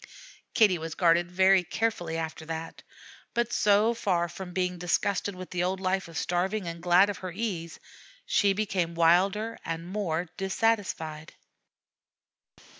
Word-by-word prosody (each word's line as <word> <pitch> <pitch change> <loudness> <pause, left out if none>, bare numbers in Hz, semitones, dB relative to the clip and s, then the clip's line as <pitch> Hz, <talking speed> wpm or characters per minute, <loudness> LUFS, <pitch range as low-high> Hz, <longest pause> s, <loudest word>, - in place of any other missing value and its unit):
Kitty 205 -7 +4
was 160 0 -6
guarded 175 0 +3
very 190 +1 +4
carefully 175 -3 -2
after 160 0 -4
that; 165 0 -6 0.5
but 235 0 0
so 210 +3 +4
far 180 -6 0
from 180 +2 -8
being 180 -1 -2
disgusted 185 +3 0
with 185 0 -9
the 180 -1 -1
old 185 +1 -1
life 190 0 -1
of 165 -2 -8
starving, 185 +4 -1
and 170 0 -6
glad 180 +2 +5
of 200 - -9
her 185 -1 -5
ease, 180 -4 -4 0.5
she 200 -1 +3
became 185 -5 -1
wilder 190 +7 +2
and 165 0 -4
more 180 -3 -2
dissatisfied. 190 -6 -1
180 Hz, 140 wpm, -28 LUFS, 170-200 Hz, 0.5 s, glad